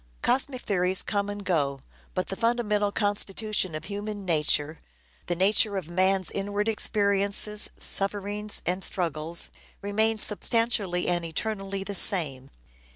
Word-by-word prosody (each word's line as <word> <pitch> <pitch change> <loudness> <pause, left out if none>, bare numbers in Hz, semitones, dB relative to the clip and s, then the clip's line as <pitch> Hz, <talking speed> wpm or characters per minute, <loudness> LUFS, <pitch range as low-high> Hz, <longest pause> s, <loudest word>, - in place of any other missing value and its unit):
Cosmic 260 -1 0
theories 185 -2 +1
come 205 -1 -1
and 205 -1 -6
go, 140 -7 0 0.3
but 185 - -2
the 195 - -3
fundamental 210 -3 +1
constitution 205 -3 0
of 155 - -6
human 205 0 -5
nature, 155 -2 +1 0.5
the 175 - 0
nature 200 +2 +2
of 185 -5 -4
man's 185 +1 +1
inward 205 +1 -2
experiences, 205 -1 +1
sufferings 205 +1 -2
and 185 +2 0
struggles, 165 -2 +1 0.3
remains 215 +2 +2
substantially 210 -4 +1
and 175 -1 0
eternally 195 +3 -3
the 200 - -5
same. 145 -9 +2
200 Hz, 125 wpm, -27 LUFS, 180-210 Hz, 0.5 s, nature